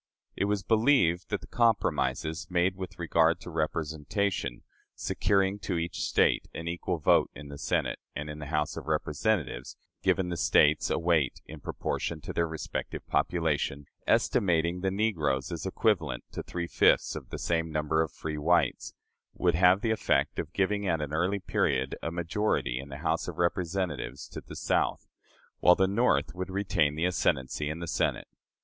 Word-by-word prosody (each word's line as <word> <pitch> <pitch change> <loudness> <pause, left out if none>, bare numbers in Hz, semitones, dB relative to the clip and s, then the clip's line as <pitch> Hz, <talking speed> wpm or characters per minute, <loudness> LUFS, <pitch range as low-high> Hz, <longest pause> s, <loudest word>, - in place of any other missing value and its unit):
It - - 0
was 100 -1 0
believed 110 - +3
that - - -1
the - - -10
compromises 100 -9 +1
made 90 +1 +2
with 95 -1 -7
regard 85 -1 +2
to 90 - -8
representation 80 - -2 0.3
securing 100 0 +1
to 90 -3 -2
each 85 +1 -3
State - - +2
an 80 - -5
equal 85 +1 -2
vote 80 - +4
in 75 0 -9
the 70 - -8
Senate, - - 0 0.2
and 75 0 -4
in 75 0 -7
the 75 - -6
House 75 0 -1
of - - -7
Representatives 75 - -1 0.2
giving 95 -2 +1
the 85 - -3
States 75 -1 +4
a - - +1
weight 80 -6 +1
in - - -10
proportion 85 - -3
to - - -6
their 85 -1 +1
respective 80 -1 -5
population, 75 -4 0 0.2
estimating 85 -1 +2
the 95 - +1
negroes 85 -10 0
as 85 +2 -4
equivalent 90 - 0
to - - -4
three 85 -1 -4
fifths - - +3
of - - -7
the - - -5
same 80 -1 0
number 75 +1 +1
of 80 - -1
free 75 -1 -5
whites 85 +3 +1 0.4
would 90 -1 +2
have 90 +3 +5
the 115 - +1
effect 110 - +1
of 80 - -4
giving 100 +2 0
at 85 -3 +1
an 75 0 -4
early 90 +5 +1
period 65 -7 0
a - - -2
majority 85 - -1
in 70 +2 -8
the 70 - -7
House 80 +1 0
of - - -6
Representatives 85 -1 -1
to - - -7
the - - -11
South, - - 0 0.5
while 90 - +6
the 95 - +3
North 115 +6 +2
would 90 +1 -5
retain 90 -7 +1
the 80 +3 0
ascendancy 75 -4 0
in 80 - -3
the 85 - -5
Senate. - - 0
85 Hz, 175 wpm, -29 LUFS, 75-95 Hz, 0.5 s, while